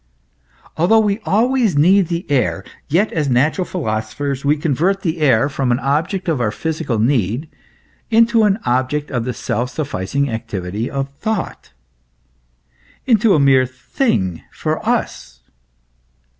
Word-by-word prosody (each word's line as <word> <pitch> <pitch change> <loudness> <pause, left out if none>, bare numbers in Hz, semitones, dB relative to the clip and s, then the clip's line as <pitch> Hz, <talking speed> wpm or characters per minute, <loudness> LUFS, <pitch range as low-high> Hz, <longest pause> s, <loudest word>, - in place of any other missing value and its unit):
"* - - -30
Although 205 +7 +4
we 205 0 0
always 230 - +2
need 185 +5 +4
the 170 +2 -3
air, 125 -8 0 0.2
yet 180 +9 +1
as 150 -4 0
natural 150 +9 +2
philosophers 135 -1 -3
we 145 +2 +2
convert 165 +7 0
the 165 -1 -1
air 135 -4 +3
from 135 -3 -1
an 120 - +2
object 160 +8 -1
of 155 -7 0
our 110 - +1
physical 150 -1 -3
need 120 - 0 0.6
into 230 0 +4
an 205 -2 +3
object 130 +4 0
of 120 -4 -2
the 125 - -2
self 120 +2 -2
sufficing 140 -2 -2
activity 110 -2 -4
of 135 0 -3
thought, 220 -4 -3 1.4
i.e. - - 0
into 220 -3 +4
a - - +3
mere 135 -2 +4
thing 130 - -1
for - - -3
us. 65 -1 -2
145 Hz, 145 wpm, -18 LUFS, 120-185 Hz, 1.4 s, Although